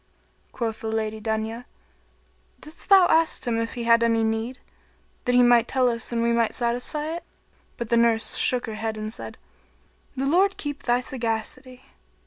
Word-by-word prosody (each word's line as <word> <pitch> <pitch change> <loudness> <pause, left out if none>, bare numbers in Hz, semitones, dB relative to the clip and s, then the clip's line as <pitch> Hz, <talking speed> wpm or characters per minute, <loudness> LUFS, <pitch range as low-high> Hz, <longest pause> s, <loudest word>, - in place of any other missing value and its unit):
Quoth 225 -2 -4
the 225 - -4
Lady 220 -1 -3
Dunya, 220 +2 -3 0.9
"Didst 315 +5 -13
thou 385 -2 +8
ask 325 0 +2
him 230 -2 0
if 230 +2 -3
he 240 - -4
had 230 0 +4
any 230 -1 +2
need, 225 +3 -2 0.7
that 245 - +1
he 250 - +6
might 240 -1 +5
tell 260 -1 +2
us 230 -1 -1
and 230 -1 0
we 235 0 +2
might 230 -2 +1
satisfy 245 +5 -1
it?" 340 - -6 0.5
But 235 -2 -5
the 235 - +3
nurse 230 -2 +2
shook 250 -1 +1
her 225 - -6
head 220 0 -4
and 215 0 -5
said, - - -7 0.8
"The 265 - -1
Lord 375 +7 +2
keep 290 -1 -5
thy 245 0 +1
sagacity! 250 +1 -5
235 Hz, 175 wpm, -24 LUFS, 225-255 Hz, 0.9 s, thou